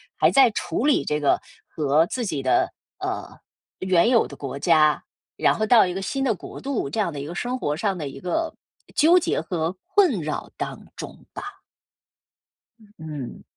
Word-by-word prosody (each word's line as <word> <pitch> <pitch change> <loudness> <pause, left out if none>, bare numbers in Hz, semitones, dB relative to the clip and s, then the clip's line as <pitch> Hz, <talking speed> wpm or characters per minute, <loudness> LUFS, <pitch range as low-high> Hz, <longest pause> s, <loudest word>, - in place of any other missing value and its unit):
还 - - +4
在 270 -3 +6
处 180 +4 -2
理 295 - +3
这 150 0 0
个 145 - +2 0.3
和 150 +1 +2
自 245 +4 -3
己 155 -8 -2
的 130 - +2 0.3
呃， - - -4 0.4
原 185 +3 +3
有 235 -3 +4
的 - - -11
国 140 -1 -5
家， 155 -1 +4 0.3
然 - - +4
后 215 - 0
到 230 -2 +7
一 180 - -3
个 195 - -4
新 270 +7 -2
的 240 -5 +2
国 - - -10
度， 270 - -2
这 155 - -3
样 170 - 0
的 145 - -5
一 - - -5
个 170 - -6
生 245 +5 -2
活 145 - -1
上 195 +1 0
的 150 -4 -4
一 - - -10
个 315 - -2 0.4
纠 335 +4 +6
结 - - 0
和 170 -1 -2
困 370 - +3
扰 150 0 -4
当 - - -5
中 - - -9
吧。 405 0 -8 1.2
嗯 210 -2 -21
嗯。 150 -5 -7
185 Hz, 205 characters per minute, -24 LUFS, 155-245 Hz, 1.2 s, 到